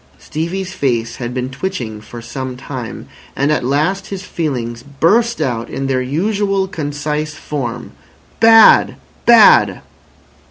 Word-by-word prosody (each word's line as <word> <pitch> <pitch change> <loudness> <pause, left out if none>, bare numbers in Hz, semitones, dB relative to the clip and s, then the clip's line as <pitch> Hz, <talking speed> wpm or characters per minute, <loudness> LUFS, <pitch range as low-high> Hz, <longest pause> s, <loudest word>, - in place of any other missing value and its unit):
Stevie's 180 +4 -4
face 120 -7 -1
had 120 -1 -4
been 125 +1 -4
twitching 130 - -5
for 115 +2 -10
some 130 +2 -6
time, 125 -3 -7 0.3
and 140 +2 +1
at 150 - 0
last 155 +10 0
his 195 -1 -6
feelings 125 -10 -4
burst 185 - +1
out 120 -3 -2
in 135 - -4
their 130 -1 0
usual 195 +7 0
concise 150 -2 -4
form. 120 -6 -5 0.5
"Bad! 225 -1 +6 0.3
Bad!" 235 -2 +6
145 Hz, 125 wpm, -17 LUFS, 125-190 Hz, 0.5 s, Bad